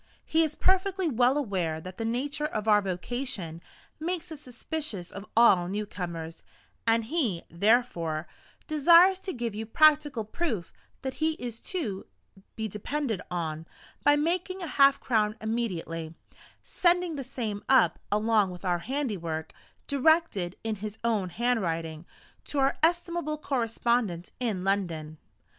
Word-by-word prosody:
He 320 - +3
is 310 -2 +1
perfectly 380 0 +2
well 250 +3 +3
aware 185 - -1
that 185 +3 -9
the 225 - -3
nature 285 +6 -1
of 215 -7 -4
our 210 -1 +6
vocation 190 -2 -4 0.4
makes 345 +1 -3
us 305 -2 -8
suspicious 250 - -5
of 200 +1 -8
all 190 -7 +6
newcomers, 175 -5 -5 0.5
and 225 0 +4
he, 235 - -1
therefore, 170 -5 +1 0.4
desires 340 +5 +6
to 380 0 -4
give 235 - -3
you 220 +1 -5
practical 295 -3 +4
proof 220 - -3 0.3
that 265 -1 -2
he 320 0 +3
is 240 -6 -6
to 235 - -4 0.5
be 220 0 -2
depended 220 +1 -3
on, 165 -2 -3 0.4
by 290 - +6
making 360 +5 -1
half 280 -5 +5
a - - -21
crown 215 -4 +1
immediately, 190 -8 -3
and 160 - -14 0.5
sending 350 -2 +2
the 275 - -4
same 230 -6 -4
up, 265 0 +5
along 210 -1 +3
with 180 +1 -9
our 175 -1 +1
handiwork, 180 - -3 0.3
directed 280 - +2
in 220 -1 -2
his 210 +1 -6
own 215 -5 +1
handwriting, 170 -7 -1 0.4
to 290 - -4
our 270 0 +3
estimable 340 -2 +1
correspondents 235 - -1
in 215 -7 -1
London. 165 -6 -1
230 Hz, 140 wpm, -28 LUFS, 185-295 Hz, 0.5 s, our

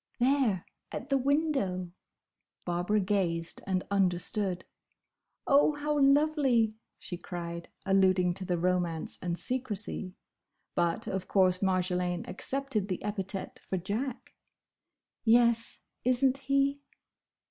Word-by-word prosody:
"There! 245 -7 +2 0.3
At - - -6
the 275 - +3
window!" 265 - 0 0.7
Barbara 175 +4 +1
gazed 180 -4 -1
and 185 -1 0
understood. 190 0 0 0.8
"Oh, 285 +2 +5
how 295 0 0
lovely!" 275 -5 +4 0.2
she 175 - -6
cried, 170 -1 -6 0.2
alluding 185 -2 +4
to 190 - -5
the 180 -1 0
romance 175 -2 -1
and 175 -1 -2
secrecy. 210 -6 -3 0.6
But, 170 +7 0
of 190 -3 -3
course 185 -2 +3
Marjolaine 180 -2 0
accepted 265 -2 -2
the 185 -3 -3
epithet 195 -2 -4
for 190 - -3
Jack. 220 +8 -4 0.9
"Yes, 235 0 +3 0.2
is 255 +2 +2
n't 265 +1 +2
he?" 275 +1 +1
200 Hz, 110 wpm, -30 LUFS, 180-260 Hz, 0.9 s, Oh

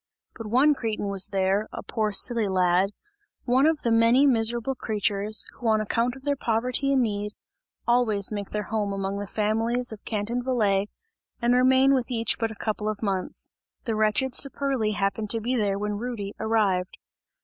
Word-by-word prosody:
But 225 -2 -8
one 260 +7 +4
cretin 220 -6 -3
was 195 -1 +2
there, 195 +2 0
a - - -7
poor 215 -1 -1
silly 225 +1 +3
lad, 185 0 +2 0.5
one 260 +4 +3
of 320 -2 0
the 235 - +1
many 230 +4 +5
miserable 235 0 +1
creatures, 210 -3 0
who 240 - -5
on 220 -1 +3
account 230 +3 0
of 265 - -13
their 285 0 0
poverty 250 +3 0
and 260 -2 +3
need, 210 -2 -3 0.5
always 225 -5 +2
make 205 -2 -4
their 210 0 -3
home 205 -1 -2
among 195 0 -3
the 205 - -5
families 225 +5 0
of 215 -1 -10
Canton 225 +3 -2
Valais 210 -6 +1 0.5
and 240 +1 +2
remain 260 +2 +4
with 255 -3 0
each 230 -3 -1
but 225 -1 0
a 220 - -9
couple 215 0 -3
of 215 +1 -5
months. 190 -3 -2 0.3
The 225 - -2
wretched 215 +5 +1
Saperli 270 -6 0
happened 200 +2 -1
to 230 - +2
be 245 +4 -1
there 205 -4 +1
when 205 0 -3
Rudy 220 -4 -5
arrived. 205 -5 0
220 Hz, 180 wpm, -25 LUFS, 205-245 Hz, 0.5 s, many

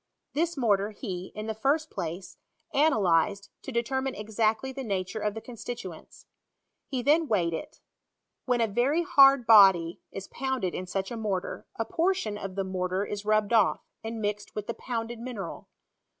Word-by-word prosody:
This 335 +2 0
mortar 205 -5 +2
he, 190 -4 -6
in 215 0 -5
the 220 - -2
first 285 +8 0
place, 175 0 -5 0.3
analyzed, 200 - +2
to - - -7
determine 265 +2 -1
exactly 220 +4 0
tie 270 - -5
nature 195 -3 -2
of 210 0 -1
the 225 - -5
constituents. 230 -7 -8 0.6
He 255 -3 -3
then 310 +4 +4
weighed 175 -8 +1
it. 160 - -7 0.6
When 245 -2 +2
a 225 - +3
very 255 +11 +1
hard 275 -7 +6
body 190 -6 +6
is 195 0 -7
poundedin 245 -9 -2
sucha 195 +5 -3
mortar, 195 -4 -3
2. 225 - -1
portion 335 - 0
of 195 -2 -6
die 195 - 0
mortar 185 +1 -1
is 205 0 -5
rubbed 215 +1 +2
off, 220 -4 +4 0.2
and 225 0 -4
mixed 210 -1 -3
with 210 - -3
the 235 - -3
pounded 230 -1 -4
mineral. 230 -7 -6
220 Hz, 160 wpm, -28 LUFS, 195-255 Hz, 0.6 s, hard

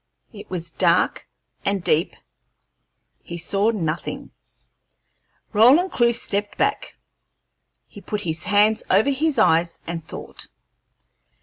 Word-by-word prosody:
It 205 - -11
was 170 -2 -5
dark - - +1 0.4
and 200 -2 -1
deep; 165 +3 +1 1.1
he 170 - -7
saw 195 +5 0
nothing. 170 -7 -4 1.2
Roland 270 - +5
Clewe 235 -1 +3
stepped 205 -3 -1
back; - - -1 0.9
he - - -13
put 210 -1 -4
his 160 -2 -3
hands 210 +2 +3
over 210 +9 +3
his 295 +1 0
eyes 170 -5 +2
and 165 -1 -5
thought. - - -8
205 Hz, 110 wpm, -22 LUFS, 170-230 Hz, 1.2 s, Roland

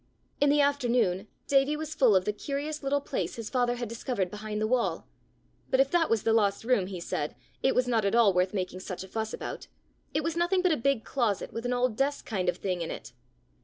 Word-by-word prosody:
In 285 - +4
the 290 +1 +4
afternoon, 240 -9 +1 0.2
Davie 280 +2 +3
was 310 0 -4
full 255 -9 +4
of 185 -1 +3
the 210 - 0
curious 290 +6 -4
little 280 0 0
place - - -3
his 230 -2 -6
father 245 -2 +1
had 240 -1 -4
discovered 230 -5 -2
behind 210 0 -4
the 215 - +1
wall; 240 +1 0 0.6
but, 260 - +2
if 270 0 +4
that 340 -2 +3
was 225 -3 +2
the 225 - +3
lost 205 -2 +2
room, 225 -6 +2
he 185 -2 -6
said, 170 -3 -3 0.3
it 265 - +2
was 250 0 +2
not 230 -3 +2
at 200 +3 +1
all 225 -5 +5
worth 180 +1 +2
making 185 -2 -3
such 185 -1 -6
a - - -10
fuss 220 +2 -3
about: - - -6 0.4
it 305 - 0
was 330 +1 -1
nothing 345 +2 +2
but 365 - +4
a - - +4
big 275 -3 +1
closet, 235 -7 -1
with 230 +2 -3
an 250 - 0
old 245 -2 +1
desk 280 +1 0
kind 190 -6 -1
of - - -1
thing 180 -3 -2
in 165 - -3
it! - - -7
235 Hz, 240 wpm, -29 LUFS, 200-275 Hz, 0.6 s, all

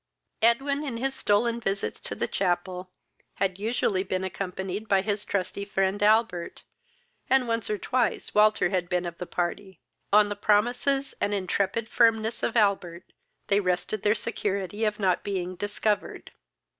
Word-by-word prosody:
Edwin, 275 +6 +2
in 265 -6 -4
his 265 +3 -1
stolen 230 +1 +1
visits 195 -3 -2
to - - -6
the - - -1
chapel, 180 0 -1 0.5
had 190 -1 -1
usually 210 -3 0
been 185 -1 -2
accompanied 190 +2 -4
by 195 -2 +3
his 205 0 -1
trusty 200 0 -2
friend 195 0 0
Albert, 210 -5 +2 0.7
and 265 -2 +3
once 230 -1 -1
or 210 - 0
twice 245 +1 -1
Walter 210 -3 +4
had 180 -2 -1
been 180 0 0
of 170 -1 -6
the 180 - -5
party. 185 +1 -3 0.3
On 210 +1 +6
the 205 - -3
promises 245 +7 +1
and 205 0 +1
intrepid 200 +3 -1
firmness 225 -1 +2
of 235 - 0
Albert 195 -5 0 0.3
they 200 - +3
rested 180 +2 -1
their 210 +1 +3
security 205 -2 -2
of 210 0 -1
not 185 -3 +2
being 185 -2 -3
discovered. 205 +2 -2
205 Hz, 155 wpm, -27 LUFS, 185-220 Hz, 0.7 s, On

